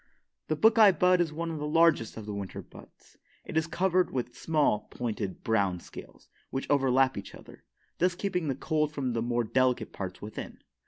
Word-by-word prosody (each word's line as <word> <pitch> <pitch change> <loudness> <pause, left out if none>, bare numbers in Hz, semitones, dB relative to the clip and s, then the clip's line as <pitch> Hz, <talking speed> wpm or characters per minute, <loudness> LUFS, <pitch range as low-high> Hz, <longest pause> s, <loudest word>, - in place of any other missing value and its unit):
The 155 - 0
buckeye 215 +2 +6
bud 180 +2 +3
is 165 -3 0
one 165 +2 -4
of 160 - -5
the 150 - -3
largest 165 -8 +3
of 110 - -7
the 105 - -5
winter 100 -2 -6
buds. - - -17 0.3
It - - -8
is 160 0 +1
covered 185 +1 +1
with 125 -1 -4
small, 150 -9 +1
pointed, 110 -5 -4
brown 100 -5 +1
scales, - - -13 0.2
which 135 - -4
overlap 135 -3 +3
each 100 - -10
other, - - -15 0.3
thus 180 0 +2
keeping 180 -3 -2
the 135 - -1
cold 150 +2 0
from 135 -5 -2
the 115 - -1
more 120 0 0
delicate 125 0 +1
parts 95 -2 -6
within. 105 +1 -8
135 Hz, 190 wpm, -29 LUFS, 115-165 Hz, 0.3 s, buckeye